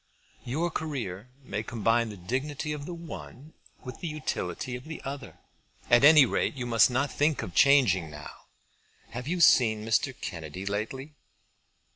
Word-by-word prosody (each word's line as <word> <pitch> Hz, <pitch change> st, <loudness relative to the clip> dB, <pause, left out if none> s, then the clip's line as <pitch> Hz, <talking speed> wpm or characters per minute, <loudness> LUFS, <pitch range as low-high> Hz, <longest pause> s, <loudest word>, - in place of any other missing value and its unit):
"Your 160 Hz, +8 st, -2 dB
career 125 Hz, -, -5 dB
may 105 Hz, -4 st, -4 dB
combine 115 Hz, +1 st, 0 dB
the 105 Hz, -, -9 dB
dignity 135 Hz, -, -3 dB
of 145 Hz, -1 st, -7 dB
the 175 Hz, -, -5 dB
one 160 Hz, -3 st, -10 dB, 0.3 s
with 125 Hz, -2 st, -8 dB
the 175 Hz, -, -5 dB
utility 150 Hz, -4 st, -4 dB
of 125 Hz, -, -9 dB
the 160 Hz, 0 st, -7 dB
other. 140 Hz, +1 st, -7 dB, 0.5 s
At 120 Hz, +2 st, +6 dB
any 150 Hz, -1 st, +8 dB
rate 120 Hz, -, -1 dB
you 125 Hz, -2 st, -4 dB
must 115 Hz, -1 st, +4 dB
not 130 Hz, +3 st, 0 dB
think 150 Hz, -1 st, +1 dB
of 90 Hz, -, -7 dB
changing 120 Hz, -, +4 dB
now. 75 Hz, -1 st, -9 dB, 0.8 s
Have 125 Hz, +3 st, -6 dB
you 180 Hz, +3 st, -1 dB
seen 110 Hz, -9 st, +4 dB
Mr. 115 Hz, +4 st, 0 dB
Kennedy 85 Hz, +1 st, -6 dB
lately?" 115 Hz, +9 st, -4 dB
125 Hz, 155 wpm, -28 LUFS, 110-145 Hz, 0.8 s, any